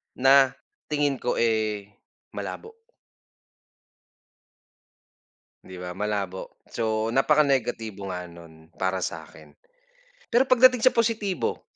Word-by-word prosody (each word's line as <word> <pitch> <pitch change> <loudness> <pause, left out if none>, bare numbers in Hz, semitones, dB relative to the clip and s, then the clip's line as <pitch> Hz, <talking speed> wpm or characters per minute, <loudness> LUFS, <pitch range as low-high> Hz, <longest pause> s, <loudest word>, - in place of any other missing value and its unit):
na 135 0 +5 0.4
tingin 145 -2 +1
ko, 125 - -1
eh, 110 -3 0 0.4
malabo. 450 0 -7 2.9
Di 95 -1 -10
ba, 90 0 -7
malabo 100 -3 -4
so 110 -1 -1
napaka 135 +5 +3
negatibo 115 -7 0
nga 90 -1 -6
nun 80 -2 -15
para 95 0 -1
sa'kin. - - -8 0.8
Pero 255 +3 +3
pagdating 255 -1 +6
sa 255 +3 +4
positibo, 220 -5 -1
115 Hz, 95 wpm, -25 LUFS, 95-150 Hz, 2.9 s, pagdating